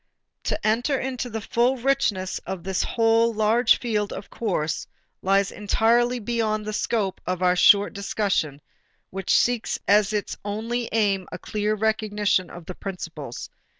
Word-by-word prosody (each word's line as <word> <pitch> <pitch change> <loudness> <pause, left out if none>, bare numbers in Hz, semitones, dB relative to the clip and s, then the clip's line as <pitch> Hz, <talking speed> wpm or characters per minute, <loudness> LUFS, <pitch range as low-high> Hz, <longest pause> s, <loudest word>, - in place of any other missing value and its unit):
To - - 0
enter 245 +6 +1
into 255 -1 -3
the 225 -1 -4
full 240 +5 +1
richness 230 -8 0
of 190 -2 -6
this 190 -1 -1
whole, 230 0 +3
large 220 +2 +3
field 210 -4 -1
of 200 - -8
course 165 -9 -2 0.3
lies 195 +1 +2
entirely 235 +4 +2
beyond 220 -2 -1
the 215 - -4
scope 210 -3 -1
of 185 0 -1
our 180 0 +4
short 200 +2 +5
discussion, 195 -8 -1 0.5
which 190 0 +1
seeks 245 -2 +1
as 205 0 +4
its 210 -1 -2
only 225 +4 -3
aim 200 -4 +1
a - - -5
clear 210 +2 -1
recognition 210 -3 0
of 175 -1 -10
the 185 - -6
principles. 165 -10 -7
210 Hz, 150 wpm, -24 LUFS, 195-230 Hz, 0.5 s, short